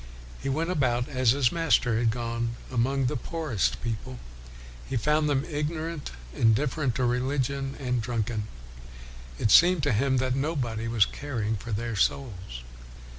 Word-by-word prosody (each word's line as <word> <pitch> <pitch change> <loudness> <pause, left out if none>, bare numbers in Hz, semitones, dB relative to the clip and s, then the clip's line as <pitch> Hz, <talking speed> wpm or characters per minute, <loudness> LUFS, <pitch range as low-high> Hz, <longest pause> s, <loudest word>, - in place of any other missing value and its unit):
1 - - -16
He - - -2
went 160 +6 0
about, 125 -7 +1
as 130 -3 +1
his 125 0 +3
Master 140 -9 +2
had 115 -1 +2
gone, 115 0 -2 0.2
among 130 +2 +1
the 120 - 0
poorest 115 - -2
people. 105 - -4 0.7
He 135 - 0
found 150 +5 +2
them 140 0 +1
ignorant, 155 0 -3 0.2
indifferent 125 - +2
to 130 - 0
reli 125 +3 0
gion, 135 +1 -2
and 125 -3 -1
drunken. 110 -2 -2 0.9
It 105 - +1
seemed 175 -3 +6
to 145 - +2
him 130 +4 +2
that 130 0 +1
nobody 130 -6 -2
was 115 -3 +4
caring 115 -7 -3
for 115 +3 -7
their 115 +2 -2
souls. 95 - -1
125 Hz, 155 wpm, -27 LUFS, 115-140 Hz, 0.9 s, seemed